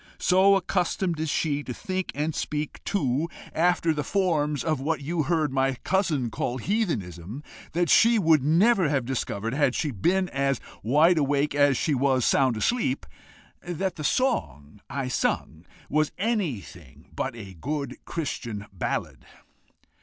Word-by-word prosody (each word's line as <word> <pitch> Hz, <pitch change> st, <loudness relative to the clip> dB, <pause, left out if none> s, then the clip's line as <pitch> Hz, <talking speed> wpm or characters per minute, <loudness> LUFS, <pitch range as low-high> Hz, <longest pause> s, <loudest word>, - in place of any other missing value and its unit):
so 190 Hz, +2 st, +4 dB
accustomed 180 Hz, -2 st, 0 dB
is 160 Hz, -1 st, -1 dB
she 145 Hz, -1 st, 0 dB
to 125 Hz, -4 st, -6 dB
think 185 Hz, -3 st, -3 dB
and 150 Hz, +2 st, -1 dB
speak 150 Hz, 0 st, -4 dB
too 150 Hz, -4 st, 0 dB, 0.2 s
after 170 Hz, -1 st, +2 dB
the 150 Hz, -1 st, -2 dB
forms 150 Hz, -6 st, 0 dB
of 155 Hz, -4 st, 0 dB
what 150 Hz, +2 st, -1 dB
you 160 Hz, +4 st, -1 dB
heard 155 Hz, -2 st, 0 dB
my 135 Hz, 0 st, +1 dB
cousin 155 Hz, -, 0 dB
call 120 Hz, +3 st, -2 dB
heathenism, 120 Hz, -, -2 dB, 0.3 s
that 175 Hz, +1 st, +1 dB
she 230 Hz, +5 st, +5 dB
would 160 Hz, -8 st, +4 dB
never 180 Hz, -, +4 dB
have 135 Hz, -4 st, 0 dB
discovered, 115 Hz, -3 st, -3 dB
had 135 Hz, -3 st, +2 dB
she 150 Hz, -3 st, -1 dB
been 180 Hz, -, +1 dB
as 135 Hz, -1 st, 0 dB, 0.2 s
wide 155 Hz, +8 st, +4 dB
awake 145 Hz, 0 st, +1 dB
as 145 Hz, -2 st, +4 dB
she 155 Hz, -, 0 dB
was 130 Hz, -2 st, +2 dB
sound 130 Hz, -4 st, +3 dB
asleep, 135 Hz, -, 0 dB, 0.6 s
that 175 Hz, +1 st, -3 dB
the 155 Hz, -, -6 dB
song 105 Hz, -, -1 dB
I 135 Hz, -2 st, -3 dB
sung 130 Hz, -, -2 dB, 0.2 s
was 155 Hz, +1 st, +1 dB
anything 155 Hz, -, -4 dB
but -, -, -2 dB
a 100 Hz, -5 st, -9 dB
good 140 Hz, -, -4 dB
Christian 120 Hz, -9 st, -4 dB
ballad." 90 Hz, -, -3 dB
150 Hz, 145 wpm, -26 LUFS, 130-175 Hz, 0.6 s, she